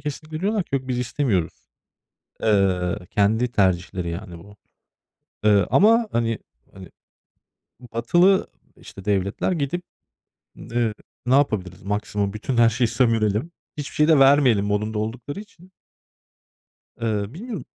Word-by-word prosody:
kesinlikle 155 +2 -6
diyorlar 205 0 0
ki: - - -6
"Yok, 130 -1 -2
biz 125 -1 -1
istemiyoruz." 115 - -1 0.9
Eee, 95 -3 +2
kendi 110 +4 +2
tercihleri, 90 -4 0
yani, 85 -1 -7
bu. 105 +4 -15 0.9
Eee, 100 -3 +4
ama, 225 +2 +4
hani 115 -1 0 0.4
hani, 95 -3 -11 1.1
batılı, 175 +12 +3 0.3
işte, 95 - -13
devletler 100 - 0
gidip, 165 +2 -2 0.7
eee, 115 -1 -2 0.3
"Ne 125 - +2
yapabiliriz? 95 -10 0
Maksimum 105 0 -2
bütün 115 +4 -3
her 115 -1 +6
şeyi 120 +1 +1
sömürelim. 115 +3 +1 0.3
Hiçbir 145 - -6
şey 150 - +3
de 160 -3 +5
vermeyelim." 135 -7 +5
modunda 105 +1 -1
oldukları 120 - -5
için. 185 -3 -15 1.3
Eee, 110 -1 -2
bilmiyorum. 205 - -7
115 Hz, 120 wpm, -23 LUFS, 100-145 Hz, 1.3 s, her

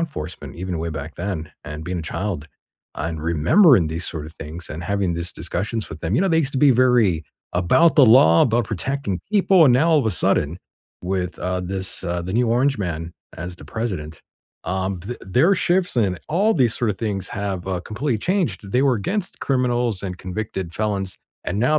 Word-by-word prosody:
enforcement, 90 - -5
even 90 -1 -4
way 85 +1 -3
back 75 +1 -6
then, 85 -4 -4
and 75 -1 -7
being 90 0 -3
a - - -6
child, 80 -2 -4 0.5
and 80 -1 -3
remembering 85 - +5
these 80 +3 -4
sort 75 -2 -5
of 80 - -11
things, 80 +3 -8
and 80 +3 -6
having 100 -2 0
these 85 0 -4
discussions 110 +4 -3
with 80 -1 -9
them 90 +5 0
you - - +3
know, 195 - +2
they 165 -1 +3
used 145 -4 +1
to 135 - -1
be 140 -2 +6
very 115 -10 +3 0.3
about 90 - +4
the 140 - +7
law, 110 -9 +7
about 120 0 +2
protecting 110 0 -2
people, 195 -4 +5
and 130 - +6
now 160 +7 +3
all 155 - +5
of 115 - -2
a - - +2
sudden 85 -1 +1 0.4
with, 90 -2 -2
uh, 90 0 -2
this 95 +1 -4
uh, 85 0 -1
the 95 +2 -5
new 120 +1 +2
orange 130 +4 +2
man 85 -3 -4 0.2
as 90 +1 -6
the - - -12
president, 80 -4 -4 0.4
um, 95 0 -2
th 115 +7 -6
their 130 - +3
shifts, 180 -2 +1
and 95 -6 +1
all 200 +7 +3
these 125 -7 +2
sort 115 -3 0
of 95 - -5
things 105 -4 -2
have, 100 -3 -4
uh, 95 - -1
completely 115 +4 -2
changed; 115 - -1
they 125 +2 +3
were 135 -3 +4
against 180 - -3
criminals 120 -6 0
and 90 -2 -5
convicted 95 -2 -5
felons, 100 -3 -2 0.3
and 95 - -2
now 150 +5 +3
95 Hz, 205 wpm, -22 LUFS, 85-125 Hz, 0.5 s, the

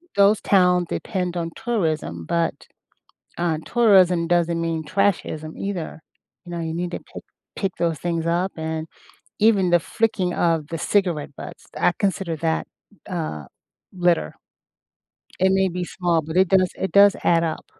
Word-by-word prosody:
those 200 +1 +4
towns 180 -2 +3
depend 180 -4 -3
on 165 -1 -3
tourism, 160 - -2
but, 170 - 0 0.9
uh, 165 -3 0
tourism 185 -7 +4
doesn't 170 -1 +1
mean 165 -1 -2
"trashism" 160 -3 -1
either. 185 -5 -4 0.4
You 175 - -9
know, 170 - -3
you 160 0 -3
need 175 +1 -3
to - - -4
pick - - -12 0.3
pick 195 -3 -2
those 165 -3 -1
things 165 0 -2
up 175 +3 +1
and 160 0 -4 0.5
even 205 -4 +4
the 175 -1 +4
flicking 195 -2 -1
of 165 -4 0
the 165 - -4
cigarette 170 -7 0
butts, - - -10
I - - +3
consider 190 -4 -1
that, 160 +1 -1 0.4
uh, 155 - -4 0.5
litter. 175 - +1 1.0
It 190 +1 +4
may 190 0 +3
be 180 0 -3
small, 175 -2 0
but 160 +3 -4
it 190 0 +5
does 185 -1 +3
it 190 - -3
does 200 0 +7
add 170 -1 +3
up. 160 -1 -3
175 Hz, 155 wpm, -22 LUFS, 165-190 Hz, 1.0 s, does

